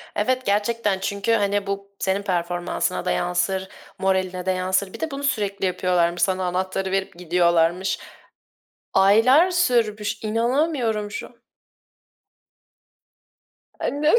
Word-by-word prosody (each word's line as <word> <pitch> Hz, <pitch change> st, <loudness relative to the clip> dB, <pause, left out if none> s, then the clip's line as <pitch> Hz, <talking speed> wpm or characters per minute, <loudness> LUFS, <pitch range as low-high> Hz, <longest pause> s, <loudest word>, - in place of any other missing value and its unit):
Evet 255 Hz, +5 st, 0 dB
gerçekten 205 Hz, 0 st, +1 dB
çünkü 200 Hz, +3 st, -1 dB
hani 205 Hz, -2 st, +1 dB
bu 200 Hz, 0 st, -5 dB
senin 190 Hz, +1 st, 0 dB
performansına 175 Hz, 0 st, -2 dB
da -, -, +1 dB
yansır, 190 Hz, +2 st, 0 dB, 0.3 s
moraline 185 Hz, -1 st, 0 dB
de 190 Hz, -, +2 dB
yansır. 185 Hz, +1 st, 0 dB
Bir -, -, -9 dB
de 320 Hz, -, -3 dB
bunu 275 Hz, +1 st, -5 dB
sürekli 205 Hz, -8 st, -1 dB
yapıyorlarmış, 175 Hz, -2 st, +1 dB
sana 185 Hz, -1 st, +1 dB
anahtarı 185 Hz, +1 st, -2 dB
verip 195 Hz, -2 st, -1 dB
gidiyorlarmış. 175 Hz, +1 st, +1 dB, 0.9 s
Aylar 240 Hz, -, +5 dB
sürmüş, 230 Hz, -, 0 dB
inanamıyorum 230 Hz, -1 st, 0 dB
şu -, -, -5 dB
an. 235 Hz, 0 st, -22 dB, 2.4 s
Annem 300 Hz, +6 st, +2 dB
200 Hz, 115 wpm, -23 LUFS, 185-225 Hz, 2.4 s, Aylar